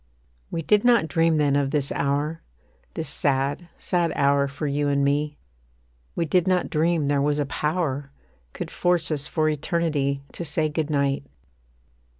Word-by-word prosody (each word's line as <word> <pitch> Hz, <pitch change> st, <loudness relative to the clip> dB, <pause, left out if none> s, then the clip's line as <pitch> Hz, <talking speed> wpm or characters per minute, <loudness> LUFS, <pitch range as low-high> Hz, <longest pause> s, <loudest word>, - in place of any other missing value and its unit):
We 165 Hz, -, -3 dB
did 210 Hz, +5 st, +3 dB
not 235 Hz, -8 st, +4 dB
dream 165 Hz, 0 st, +2 dB
then 145 Hz, -2 st, +2 dB
of 140 Hz, -1 st, +1 dB
this 140 Hz, -1 st, -1 dB
hour, 145 Hz, +3 st, -1 dB, 0.5 s
This 160 Hz, -, -3 dB
sad, 140 Hz, +4 st, 0 dB
sad 175 Hz, -2 st, 0 dB
hour 140 Hz, 0 st, +3 dB
for 140 Hz, +2 st, -5 dB
you 145 Hz, 0 st, 0 dB
and 140 Hz, 0 st, +2 dB
me; 145 Hz, +1 st, 0 dB, 0.8 s
We 170 Hz, -, 0 dB
did 180 Hz, +3 st, +2 dB
not 185 Hz, -1 st, +1 dB
dream 160 Hz, 0 st, +1 dB
there 140 Hz, 0 st, +1 dB
was 145 Hz, +1 st, +1 dB
a 145 Hz, -, 0 dB
power 145 Hz, -2 st, -2 dB, 0.4 s
Could -, -, -6 dB
force 175 Hz, -3 st, +1 dB
us 145 Hz, -1 st, -1 dB
for 155 Hz, 0 st, 0 dB
eternity 150 Hz, -3 st, 0 dB
To -, -, -6 dB
say 155 Hz, 0 st, 0 dB
Good 155 Hz, 0 st, -2 dB
night. 140 Hz, -1 st, 0 dB
150 Hz, 160 wpm, -24 LUFS, 140-165 Hz, 0.8 s, not